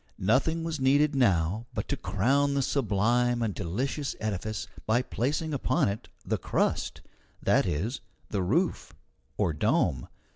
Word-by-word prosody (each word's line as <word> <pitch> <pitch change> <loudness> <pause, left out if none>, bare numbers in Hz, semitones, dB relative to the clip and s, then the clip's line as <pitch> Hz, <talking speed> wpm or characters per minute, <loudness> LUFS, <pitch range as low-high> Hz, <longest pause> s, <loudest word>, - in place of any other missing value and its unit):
Nothing 135 - +2
was 165 -2 -3
needed 140 +3 +4
now 105 -3 +2
but - - -2
to - - +1
crown 140 +6 +1
the 140 - +2
sublime 120 0 +1
and 105 -3 -1
delicious 130 - -2
edifice 110 0 -3 0.2
by 120 +3 +3
placing 150 +6 -1
upon 130 -5 +1
it 100 +2 -5 0.2
the - - -1
crust - - -1 0.4
that - - +2
is, 105 - -2 0.3
the 100 - -1
roof, 155 - 0 0.4
or 80 - +1
dome. 65 -4 +1
120 Hz, 140 wpm, -28 LUFS, 100-140 Hz, 0.4 s, needed